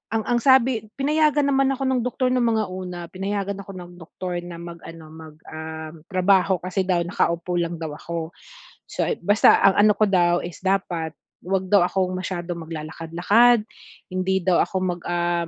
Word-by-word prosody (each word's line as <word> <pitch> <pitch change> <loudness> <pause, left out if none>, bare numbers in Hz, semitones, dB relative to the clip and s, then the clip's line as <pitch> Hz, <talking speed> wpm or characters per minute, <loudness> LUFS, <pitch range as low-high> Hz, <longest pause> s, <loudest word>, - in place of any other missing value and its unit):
ang 220 - +1 0.2
ang - - +1
sabi 255 -3 +3
pinayagan 295 0 +2
naman 270 0 +3
ako 270 - -7
ng 260 -2 +1
doktor 255 +1 0
ng 255 - +2
mga 225 -2 +1
una, 180 -1 -6
pinayagan 200 +1 -3
ako 195 0 -10
ng 180 -1 -9
doktor 175 +2 -6
na 175 -1 -8
mag 170 0 -8
ano, 165 -1 -10
mag 160 -1 -12
um, 160 0 -7
trabaho 190 0 +3
kasi 185 +1 -2
daw 180 -2 +2
nakaupo 175 +1 -1
lang 170 0 -2
daw 160 - -3
ako. 165 0 -5 0.6
So, - - -1 0.2
basta 205 +1 +5
ang 195 - +5
ano 210 - +5
ko 215 - +3
daw 175 -2 +3
is 170 -3 -7
dapat 175 -4 -1 0.3
huwag 190 0 -1
daw 195 -4 +6
akong 185 0 -1
masyadong 175 -1 -4
maglalakad-lakad, 170 +9 +2 0.5
hindi 185 +1 0
daw 180 -2 +3
ako - - -13
mag 175 -1 -2
ah, 175 -1 0
185 Hz, 175 wpm, -23 LUFS, 170-205 Hz, 0.6 s, daw